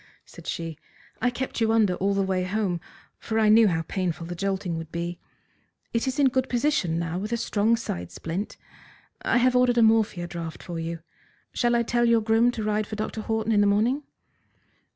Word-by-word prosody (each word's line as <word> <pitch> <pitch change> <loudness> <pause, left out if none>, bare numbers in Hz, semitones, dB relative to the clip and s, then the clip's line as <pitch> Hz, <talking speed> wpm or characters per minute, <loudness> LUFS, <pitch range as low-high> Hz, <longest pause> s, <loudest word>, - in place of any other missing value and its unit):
said - - -13
she. 165 -2 -4 0.4
"I 250 - +3
kept 245 0 -4
you 225 0 +3
under 215 -4 +3
all 195 +2 0
the 195 - +2
way 190 -1 0
home, 185 -2 -1 0.4
for 220 - -3
I 220 -1 +4
knew 220 +1 +7
how 165 -3 0
painful 175 -3 -2
the 175 - -5
jolting 190 -1 -2
would 165 -1 -6
be. 170 +1 -4 0.7
It 230 +2 0
is 260 - -1
in 280 -2 +5
good 260 0 0
position 240 - +1
now 170 +1 -2
with 210 +3 -4
a 235 - +1
strong 220 0 +2
side 90 - -5
splint. 175 +6 -5 0.6
I - - +2
have 250 +1 +3
ordered 250 -1 +4
a 235 - +6
morphia 220 -5 +3
draught 170 -2 -6
for 170 -2 -5
you. 165 0 -4 0.5
Shall 240 -1 +2
I 235 - +3
tell 240 +1 +1
your 230 -1 +4
groom 225 +2 +3
to 220 - -4
ride 210 0 0
for 215 - -5
Dr. 215 +1 -3
Horton 220 0 -1
in 210 -2 +4
the 205 - +4
morning?" 225 +8 +2
210 Hz, 205 wpm, -26 LUFS, 175-230 Hz, 0.7 s, knew